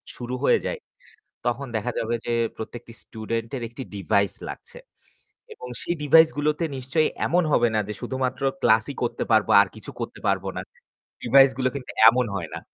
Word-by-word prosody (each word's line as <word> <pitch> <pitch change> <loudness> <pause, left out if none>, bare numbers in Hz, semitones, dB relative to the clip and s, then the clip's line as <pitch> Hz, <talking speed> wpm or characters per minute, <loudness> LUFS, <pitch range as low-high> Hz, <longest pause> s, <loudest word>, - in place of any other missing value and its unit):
শুরু 125 +1 -5
হয়ে - - +4
যায়, - - -3 0.7
তখন 120 +3 -1
দেখা 110 +3 -1
যাবে 115 +1 -1
যে 120 - -1 0.2
প্রত্যেকটি 115 +1 -8
স্টুডেন্টের 115 +3 -5
একটি 120 +3 -8
ডিভাইস 100 +1 +1 0.2
লাগছে। - - -10 0.7
এবং 455 +1 -10
সেই 170 - -2
ডিভাইসগুলোতে 150 +1 +4
নিশ্চয়ই 135 +5 0 0.2
এমন 180 +1 +2
হবে 120 -3 +4
না 110 - +2
যে 105 - -4
শুধুমাত্র 130 0 -3 0.2
ক্লাসই 110 +5 +3
করতে 120 - -1
পারব 110 -3 +4
আর 100 - +3
কিছু - - -9
করতে - - -6
পারব - - +1
না। - - -3 0.6
ডিভাইসগুলো 135 +1 +5
কিন্তু 135 -3 -6 0.2
এমন 125 +1 +3
হয় 85 -4 -5
না। - - -5
125 Hz, 160 wpm, -24 LUFS, 115-140 Hz, 0.7 s, ডিভাইসগুলো